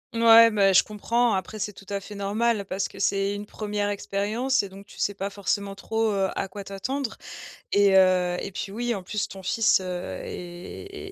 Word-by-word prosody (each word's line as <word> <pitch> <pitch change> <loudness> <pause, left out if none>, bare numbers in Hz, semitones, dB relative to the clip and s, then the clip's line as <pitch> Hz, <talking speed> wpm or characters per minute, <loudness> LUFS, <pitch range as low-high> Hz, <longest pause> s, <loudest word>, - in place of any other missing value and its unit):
Mouais, 230 0 +8
bah, 195 -2 +4
je - - +7
comprends 230 +2 0
après 190 +3 -3
c'est 210 0 -3
tout 195 - -15
à 200 0 -2
fait 205 +2 -10
normal, 205 +1 0
parce 190 +1 -2
que - - -13
c'est 195 0 +1
une 205 0 -6
1re 205 -1 -2
expérience 210 +6 0
et 200 - -7
donc 195 +1 -12
tu - - -15
sais 205 - 0
pas 200 +1 -4
forcément 200 0 -2
trop, 220 +2 -1
heu, 195 -1 +1
à 195 - -2
quoi 200 +1 -8
t'attendre. 235 +7 -4 0.5
Et 200 -1 +4
heu, 180 -1 +4
et - - -5
puis, 195 +1 -5
oui, 240 +2 -1
en 185 - -7
plus 210 +2 -2
ton 190 -1 -10
fils, 210 +1 +3
heu, - - -7 0.4
est 390 - -8
200 Hz, 205 wpm, -25 LUFS, 195-220 Hz, 0.5 s, Mouais